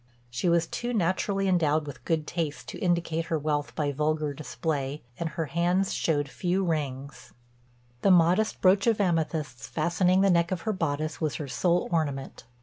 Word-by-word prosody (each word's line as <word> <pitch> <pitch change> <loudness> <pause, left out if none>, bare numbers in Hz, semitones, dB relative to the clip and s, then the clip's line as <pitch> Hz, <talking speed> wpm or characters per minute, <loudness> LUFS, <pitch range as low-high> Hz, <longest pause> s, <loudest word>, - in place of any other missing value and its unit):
She 120 +9 0
was 170 0 +3
too 240 +7 -3
naturally 195 +1 0
endowed 160 -4 +2
with 130 -4 -9
good 160 -2 0
taste 160 -3 -3
to - - -7
indicate 170 -3 0
her 165 -1 -1
wealth 150 -1 -2
by 145 -2 0
vulgar 150 +1 0
display, 145 -1 -3 0.2
and 170 - -1
her 165 0 -3
hands 175 +5 +1
showed 145 -3 0
few 180 +6 -1
rings; 140 -4 -4 0.7
the - - +3
modest 180 +4 +4
brooch 195 +3 +4
of 225 -2 +3
amethysts 160 - -1
fastening 180 +3 +2
the 195 -1 +4
neck 170 0 +2
of 185 -3 -2
her 215 - -1
bodice 155 -3 -2
was 155 -2 0
her 150 - -4
sole 175 +6 +1
ornament. 145 -8 -2
165 Hz, 170 wpm, -27 LUFS, 150-180 Hz, 0.7 s, modest